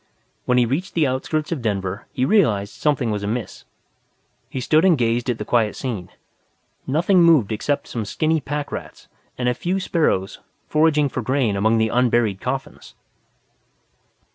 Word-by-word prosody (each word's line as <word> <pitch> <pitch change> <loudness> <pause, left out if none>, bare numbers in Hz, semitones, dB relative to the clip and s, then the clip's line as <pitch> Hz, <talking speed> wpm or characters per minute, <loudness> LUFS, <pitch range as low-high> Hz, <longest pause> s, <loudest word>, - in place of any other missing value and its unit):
When 125 - +2
he 125 - +4
reached 165 +11 -3
the 160 -3 +3
outskirts 150 +4 -2
of 160 -6 -2
Denver 100 -3 -3
he 130 - 0
realized 115 - +2
something 140 -6 0
was 105 -1 -2
amiss. 105 0 -4 0.8
He 130 - -4
stood 155 +6 +3
and 180 -4 +5
gazed 120 +1 0
at 120 - 0
the 105 - -5
quiet 110 -3 +1
scene. 105 -9 -5 0.8
Nothing 175 +7 +3
moved 160 -11 +5
except 140 +7 -1
some 115 -3 -4
skinny 155 +8 0
packrats 145 +1 -6 0.3
and 125 - -1
a 125 - +3
few 180 +9 -2
sparrows 155 - 0 0.3
foraging 150 -1 +3
for 130 - -4
grain 125 -3 0
among 110 +3 +2
the 110 0 +2
unburied 120 -5 +1
coffins. 135 +2 -5
125 Hz, 155 wpm, -21 LUFS, 110-150 Hz, 0.8 s, and